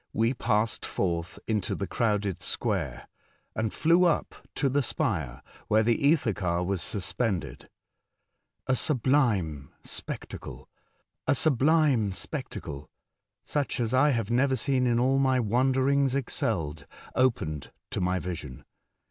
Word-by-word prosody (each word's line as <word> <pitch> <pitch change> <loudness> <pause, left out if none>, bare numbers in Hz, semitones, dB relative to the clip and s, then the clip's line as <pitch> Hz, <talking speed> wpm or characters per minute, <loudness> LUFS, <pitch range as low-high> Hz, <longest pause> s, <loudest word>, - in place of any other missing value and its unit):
we 115 +3 +2
passed 110 -3 0
forth 85 -2 -2
into 105 -4 -1
the 100 - -3
crowded 105 -4 0
square, - - -2 0.5
and 110 -1 -1
flew 170 +3 +3
up 170 -3 +1 0.2
to 140 - +1
the 140 +2 +2
spire 80 - -2 0.2
where 110 +1 +4
the 120 +5 +2
ether 140 -8 +3
car 90 -2 -1
was 95 0 -1
suspended. 100 - -2 1.0
A 130 - +2
subUme 115 - +1 0.2
spectacle - - -6 2.8
(such 145 -3 -2
as 115 0 0
I 130 +4 +5
have 115 -5 0
never 130 +2 +3
seen 130 -1 +1
in 120 -1 +2
all 135 +2 +3
my 130 -1 +3
wanderings 130 +4 +2
excelled) 80 - -2 0.3
opened 85 - 0 0.2
to - - -1
our 90 0 +1
vision. 80 -8 -6
115 Hz, 115 wpm, -28 LUFS, 90-130 Hz, 2.8 s, I